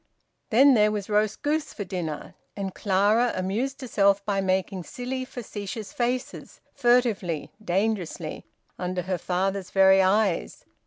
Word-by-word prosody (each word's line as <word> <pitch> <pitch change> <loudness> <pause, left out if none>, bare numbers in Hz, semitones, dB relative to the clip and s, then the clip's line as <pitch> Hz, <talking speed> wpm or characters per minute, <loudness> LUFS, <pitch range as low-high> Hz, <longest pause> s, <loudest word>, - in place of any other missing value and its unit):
Then 270 +5 +6
there 210 -3 +4
was 210 0 -4
roast 210 0 +1
goose 305 +1 -1
for 205 - -4
dinner, 175 -5 -5 0.2
and 195 -2 -4
Clara 210 +5 +2
amused 235 +10 -2
herself 200 -5 +2
by 200 -2 0
making 190 0 -1
silly 255 +6 -5
facetious 210 -4 -7
faces, 245 +1 -3
furtively, 225 - +1
dangerously, 185 -4 -2 0.3
under 180 0 -2
her 185 0 -2
father's 190 +2 -1
very 190 0 +5
eyes. 195 -1 +1
200 Hz, 125 wpm, -26 LUFS, 185-235 Hz, 0.3 s, Then